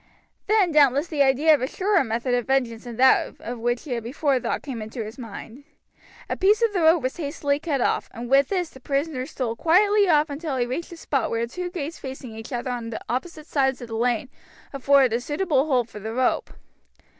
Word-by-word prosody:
"Then 405 -4 +3
doubtless 285 -1 +4
the 310 -4 -2
idea 280 +4 +5
of 295 - +2
a 255 - 0
surer 385 +1 +1
method 235 +1 -2
of 245 -1 0
vengeance 250 -4 0
than 240 -1 -7
that 260 +3 +3
of 240 +1 -6
which 240 +1 -1
he 300 - -9
had 235 -2 -2
before 270 +2 0
thought - - -3
came 260 -6 -5
into 220 +2 -5
his 220 +5 -10
mind. 230 +3 -9 0.6
A - - -2
piece 415 +4 +3
of 455 -3 +2
the 365 - 0
rope 320 -1 +4
was 255 - -2
hastily 285 -2 -1
cut 295 -5 -1
off, - - 0
and 235 +1 -7
with 275 +2 +4
this 360 -4 -2
the 265 - -14
prisoner 275 0 -2
stole 240 -5 -3
quietly 400 - +3
off 300 -2 +3
until 285 -1 -3
he 245 - +1
reached 260 +8 -4
the 340 - -10
spot 275 -5 -1
where 230 0 -1
two 355 +9 -5
gates 335 -2 -5
facing 260 -4 -8
each 225 +3 -9
other 245 0 -3
on 235 -2 -5 0.2
opposite 310 +5 -4
sides 265 -4 0
of 240 - -9
the 225 - -4
lane 240 +2 0 0.4
afforded 275 -2 +4
a 235 - 0
suitable 295 0 0
hold 250 -5 +1
for 215 - -10
the 220 +2 -6
rope. 255 0 0
270 Hz, 220 wpm, -24 LUFS, 240-315 Hz, 0.6 s, idea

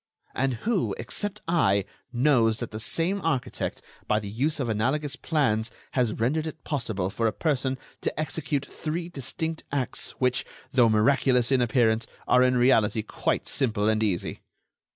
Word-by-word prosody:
"And 130 -1 0
who, 220 -5 +1
except 205 0 -3
I, 100 - +3 0.3
knows 120 -3 +3
that 120 - -5
the 110 - -5
same 170 - 0
architect, 150 -8 -2 0.2
by 105 - +3
the 105 - -7
use 145 +8 0
of 130 - -1
analogous 130 +7 0
plans, 120 -9 +1 0.2
has 125 -4 +1
rendered 150 +8 0
it 155 0 -8
possible 110 -10 -2
for 115 +2 0
a - - +2
person 135 -3 0 0.2
to - - -2
execute 145 -2 -2
three 165 +2 -4
distinct 160 +2 -4
acts 135 -4 -2
which, 125 0 +2 0.3
though 120 -3 +5
miraculous 125 +2 +3
in 130 -2 +4
appearance, 115 -2 +2 0.2
are, 125 - +5
in 125 0 +4
reality, 115 -3 +3
quite - - -1
simple 110 -6 +1
and 110 0 +2
easy?" 100 -6 -1
125 Hz, 155 wpm, -26 LUFS, 110-150 Hz, 0.3 s, though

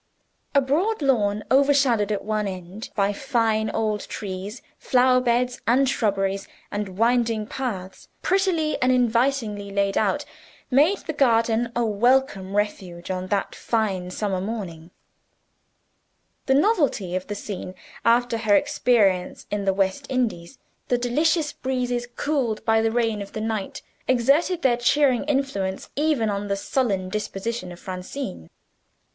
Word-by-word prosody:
A 280 - +6
broad 320 +9 0
lawn, 210 -6 +2
overshadowed 270 -6 +3
at 205 - -2
one 215 -1 -1
end 185 +3 -7
by 200 -1 +2
fine 225 -3 0
old 215 -2 -1
trees 200 +3 -6 0.2
flower 255 0 +3
beds 245 0 0
and 260 +4 +4
shrubberies, 195 -5 0 0.2
and 205 -2 -4
winding 230 -1 +2
paths 210 -7 -5 0.2
prettily 370 -5 +1
and 255 +1 +4
invitingly 235 -4 +1
laid 200 0 +1
out - - 0 0.5
made 305 +10 +4
the 315 - -3
garden 230 -4 +2
a 240 0 +1
welcome 220 -2 +1
refuge 190 -4 -2
on 185 0 -3
that 200 +1 -1
fine 195 -6 -1
summer 190 0 -2
morning. 185 -6 -5 1.6
The 265 - +4
novelty 285 - +2
of 185 0 -3
the 205 - -4
scene, 185 -2 -6 0.3
after 235 0 +3
her 215 -2 +3
experience 200 -6 +2
in 205 -1 -2
the 195 - +3
West 190 -1 -1
Indies, 230 -10 -2 0.3
the 245 - +2
delicious 295 +6 +1
breezes 250 -2 -2
cooled 265 -8 -1
by 225 0 +3
the 225 - +2
rain 225 -2 0
of 200 - -8
the - - -4
night, 220 -3 -3 0.2
exerted 280 +8 +2
their 245 -3 +4
cheering 255 +1 +3
influence 265 -10 -2
even 290 -6 +1
on 200 0 -3
the 200 - 0
sullen 200 -3 -1
disposition 210 -1 -4
of 175 - -10
Francine. 180 - -6
225 Hz, 140 wpm, -24 LUFS, 200-260 Hz, 1.6 s, A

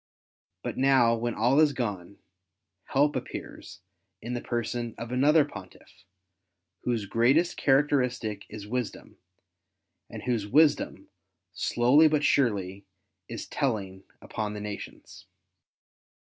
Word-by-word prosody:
But - - -4
now 130 -3 +4
when 120 0 -3
all 125 +6 +3
is 155 -2 +4
gone, 100 -7 -4 0.7
help 145 +2 +2
appears 120 -8 -7 0.4
in 120 +3 -6
the 120 - -3
person 120 -1 -3
of 115 0 -7
another 145 +4 +4
Pontiff, 95 -10 -13 0.8
whose 115 -4 -1
greatest 130 - +2
characteristic 125 -7 +1
is 105 -1 -8
wisdom, 120 +1 -5 0.9
and 110 -2 -8
whose 115 -5 -1
wisdom, 150 +6 +2 0.4
slowly 130 +7 +4
but 150 -1 +1
surely, 100 -9 +1 0.4
is 115 - -6
telling 100 -9 -3 0.2
upon 105 -1 -4
the - - -5
nations. 105 -1 -9
120 Hz, 110 wpm, -27 LUFS, 105-135 Hz, 0.9 s, now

